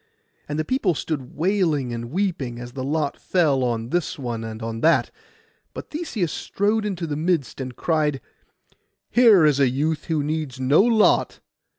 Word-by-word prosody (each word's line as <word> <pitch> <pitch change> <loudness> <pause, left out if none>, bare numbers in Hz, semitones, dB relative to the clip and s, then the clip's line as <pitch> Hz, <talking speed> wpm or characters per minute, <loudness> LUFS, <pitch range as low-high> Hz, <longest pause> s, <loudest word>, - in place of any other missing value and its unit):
And 150 - -2
the 155 - -1
people 210 - +1
stood 145 -4 -4
wailing 160 -7 0
and 120 0 -5
weeping, 160 -8 -2
as 120 0 -8
the 130 +1 -5
lot 145 +1 -1
fell 150 -8 +2
on 115 -1 -2
this 175 +3 -1
one 120 -4 -4
and 110 -1 -6
on 115 0 -4
that; 165 +1 +3 0.6
but - - -8
Theseus 245 - -2
strode 210 +2 -1
into 185 -5 -3
the 150 -2 -3
midst, 155 -5 -1
and 130 -1 -6
cried—'Here 160 - 0
is 145 -2 +3
a 135 -2 +4
youth 150 +4 -1
who 160 -4 0
needs 150 -3 -3
no 130 +6 +4
lot. 225 -1 +3
150 Hz, 165 wpm, -23 LUFS, 130-180 Hz, 0.6 s, a